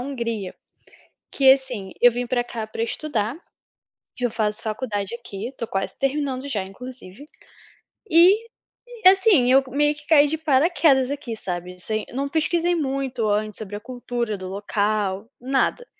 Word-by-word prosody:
Hungria. 230 -7 -4 0.8
Que 265 -1 +7
assim, 250 -8 -3
eu 245 - +7
vim 245 +1 -3
para 245 0 0
cá 230 -2 -5
para 220 +1 -4
estudar, 230 -1 -2 0.8
eu 245 -2 0
faço 210 -2 -1
faculdade 215 -2 -3
aqui, 230 -1 -7
estou 250 -3 -6
quase 195 -3 -3
terminando 275 -1 -1
já 215 -8 -2
inclusive, 240 +2 -10 0.9
e, 375 +8 +5 0.6
assim, 375 - +5
eu 270 +1 +7
meio 295 +3 +2
que 295 0 -15
caí 295 -2 +6
de 315 +2 -2
paraquedas 290 -3 +3
aqui 280 -5 -5
sabe, 180 -3 -5
assim, 215 +4 -3
não 275 +2 -2
pesquisei 335 +3 +1
muito 270 -6 -2
antes 210 0 -1
sobre 205 -2 -6
a 205 - -6
cultura 240 -2 -4
do 185 -1 -7
local, 205 +1 -1
nada. 270 - 0
245 Hz, 145 wpm, -23 LUFS, 215-280 Hz, 0.9 s, Que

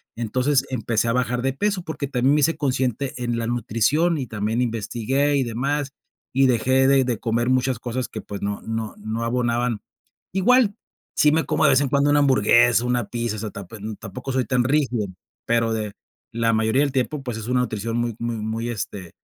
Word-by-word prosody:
Entonces, 130 +4 +1
empecé 115 -2 0
a - - +1
bajar 125 0 0
de 135 - +1
peso, 200 +5 -1
porque 155 -3 -4
también 130 +1 +2
me - - +3
hice 165 +3 +2
consciente 130 -1 -1
en 120 -1 -1
la 115 - -2
nutrición, 120 +8 +1
y 135 - -2
también 110 +2 -1
investigué, 120 +5 0
y 135 - +2
demás. 135 +4 -2 0.4
Y 135 0 +5
dejé 130 +2 +3
de 135 -1 +5
de 120 -4 -1
comer 120 +1 0
muchas 130 -1 +1
cosas 125 +1 -3
que, 110 - -6
pues, 100 -1 -7
no 100 0 -3
no 110 -1 -4
no 110 +2 -4
abonaban. 120 -2 0 0.5
Igual, 210 +2 +4 0.4
sí 150 - +5
me 160 +1 +2
como, - - +1
de 145 - +6
vez 135 +1 +4
en 140 - 0
cuando, 140 +1 +2
una 145 - +4
hamburguesa, 120 -3 +4
una 125 -3 0
pizza, 120 -2 -2
o - - -5
sea, 105 0 -5
tap 100 0 -9
em, 110 0 -6
tampoco 110 +6 -7
soy 130 -1 +1
tan 125 -2 +1
rígido, 130 -5 +1 0.4
pero 115 -1 +1
de 110 -2 -3 0.4
la 115 0 +1
mayoría 110 +5 +2
del 145 - 0
tiempo, 135 +3 -1
pues, 120 -3 -4
es 110 - -6
una 125 - +2
nutrición 115 -1 -2
muy 120 -2 -1
muy 115 -1 -2
muy, 110 +2 -3
este, 100 -6 -5
120 Hz, 205 wpm, -23 LUFS, 115-135 Hz, 0.5 s, de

